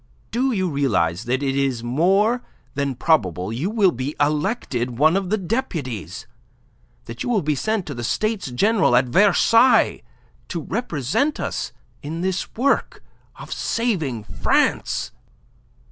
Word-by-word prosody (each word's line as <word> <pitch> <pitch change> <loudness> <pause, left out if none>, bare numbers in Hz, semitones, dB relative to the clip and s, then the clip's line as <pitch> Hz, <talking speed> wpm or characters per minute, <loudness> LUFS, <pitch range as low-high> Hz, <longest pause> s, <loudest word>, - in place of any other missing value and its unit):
Do 255 +4 +1
you 190 -5 0
realize 115 - 0
that 130 +3 -1
it 135 -1 0
is 135 -4 0
more 195 - +2 0.3
than 140 -1 -2
probable 100 - +1
you 145 +12 -2
will 210 -4 +3
be 130 +3 -4
elected 145 - -1
one 155 +5 +4
of 195 -2 -1
the 215 - +1
deputies, 130 - -4 0.8
that 115 0 -8
you - - -2
will 220 -7 +1
be 150 +1 +1
sent 215 +6 -1
to 145 - -5
the 120 -2 -6
States 215 - -1
General 200 - +2
at 125 +1 +4
Versailles 210 - +4 0.5
to 170 - -4
represent 195 - -1
us - - -3 0.3
in 160 +3 -5
this 190 0 -2
work 275 +4 0 0.3
of - - -7
saving 160 - -1
France?" - - 0
155 Hz, 140 wpm, -22 LUFS, 125-210 Hz, 0.8 s, one